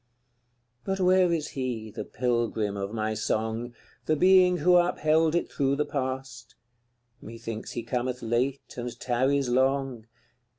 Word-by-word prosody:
CLXIV. 120 0 -46
But 195 0 -2
where 185 -1 +4
is 160 -3 -1
he, 120 -5 -4
the - - -5
pilgrim 115 -4 -1
of 100 0 -4
my 110 -1 -2
song, 110 +2 -2 0.3
The 155 - +3
being 185 +2 +5
who 180 +3 +5
upheld 160 -2 +2
it 170 - -1
through 140 0 +1
the 150 +1 0
past? 130 -4 -5 0.7
Methinks 115 0 -7
he 120 - -4
cometh 125 +1 -3
late 125 +4 -1
and 120 0 -5
tarries 130 +2 +1
long. 130 -2 0
125 Hz, 140 wpm, -27 LUFS, 115-145 Hz, 0.7 s, being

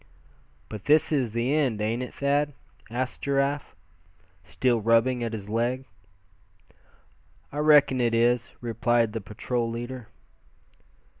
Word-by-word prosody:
"But 105 -2 -8
this 150 +3 +4
is 135 -6 +1
the 120 +5 -1
end, 135 -8 +1
ain't 110 +3 -1
it, 125 - -5
Thad?" 145 +1 0 0.4
asked 125 +2 -3
Giraffe, 140 +1 -1 0.7
still 110 +8 0
rubbing 115 +3 +2
at 115 - -2
his 105 -3 -6
leg. 120 +4 -1 1.7
"I 145 - -4
reckon 145 -4 +5
it 115 -1 +2
is," 120 0 +2
replied 115 -1 +1
the 115 - -3
patrol 115 +4 -3
leader. 120 0 -6
120 Hz, 125 wpm, -26 LUFS, 115-135 Hz, 1.7 s, reckon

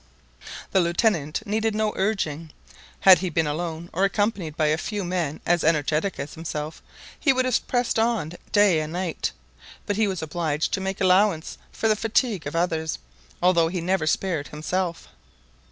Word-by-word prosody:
The 190 - +4
Lieutenant 170 -1 +1
needed 220 +1 0
no 215 0 0
urging. 165 -6 -1 0.5
Had 190 -1 +8
he 185 - -2
been 165 0 +1
alone, 165 +2 -3
or 185 - 0
accompanied 195 -6 0
by 155 - +2
a 150 0 +3
few 205 +1 -3
men 175 -4 -2
as 175 -1 +2
energetic 155 +4 +1
as 145 - -5
himself, 155 -1 -5 0.4
he 280 - +4
would 255 -1 +1
have 255 -2 0
pressed 245 -2 +1
on 225 -8 0 0.2
day 205 -6 +5
and 155 +1 -4
night; 180 -2 -2 0.5
but 205 - -1
he 220 -1 +3
was 185 -4 -3
obliged 160 -1 -1
to 195 - 0
make 190 0 -3
allowance 185 -3 +2
for 225 - -1
the 215 - +4
fatigue 225 - 0
of 145 - -5
others, 160 -2 0 0.5
although 170 -2 +4
he 180 +2 -3
never 175 -1 0
spared 160 -3 0
himself. 170 +3 -3
180 Hz, 170 wpm, -24 LUFS, 160-205 Hz, 0.5 s, Had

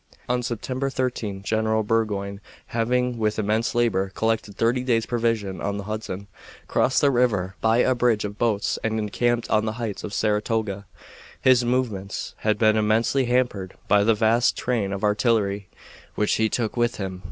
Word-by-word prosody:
On 125 0 0
September 125 +3 -3
13 115 -7 -3
General 110 +1 +1
Burgoyne, 105 -2 -1 0.3
having 125 +1 0
with 110 -1 0
immense 110 +3 0
labor 100 -5 +1
collected 110 -2 -1
thirty 120 +2 +2
days' 115 -3 +1
provisions 115 -5 -1
on 100 0 -2
the 100 - -5
Hudson, 105 -2 -5 0.4
crossed 130 - +2
the 140 -2 +4
river 105 -7 +1
by 110 +1 +3
a 130 - +3
bridge 120 -4 +1
of 105 0 -7
boats 110 -4 0
and 110 0 0
encamped 120 +3 0
on 110 0 +3
the 110 - -2
heights 115 -4 -4
of - - -5
Saratoga. 105 -2 -1 0.5
His 130 -2 +4
movements 120 -6 -2
had 105 -1 0
been 110 0 +4
immensely 110 +5 +2
hampered 120 -7 0
by 105 0 +4
the 115 +1 +3
vast 115 +2 +2
train 115 -6 -1
of 100 +1 -4
artillery 105 -2 +1 0.5
which 105 - +1
he 110 0 +2
took 115 -2 -2
with 120 0 +1
him. 95 -2 -5
110 Hz, 165 wpm, -24 LUFS, 105-120 Hz, 0.5 s, the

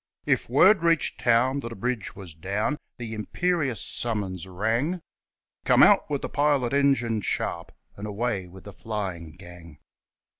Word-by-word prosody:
If - - +1
word 180 - +5
reached 165 -3 +2
town 125 +3 +3
that 115 -3 -6
a - - -7
bridge 120 0 -3
was 95 -5 -10
down, 100 - -2 0.2
The 115 -2 -6
imperious 140 - -1
summons 100 -6 -2
rang 115 - -1 0.6
'Come - - +5
out - - +5
with 145 -2 -2
the - - -1
pilot 145 -4 +1
engine 135 -6 +2
sharp, 85 -3 -3 0.2
And 105 +1 -6
away 105 -2 -2
with 95 +1 -13
the 100 - -10
flying 95 -8 -5
gang.' 85 -4 -13
115 Hz, 150 wpm, -26 LUFS, 95-135 Hz, 0.6 s, word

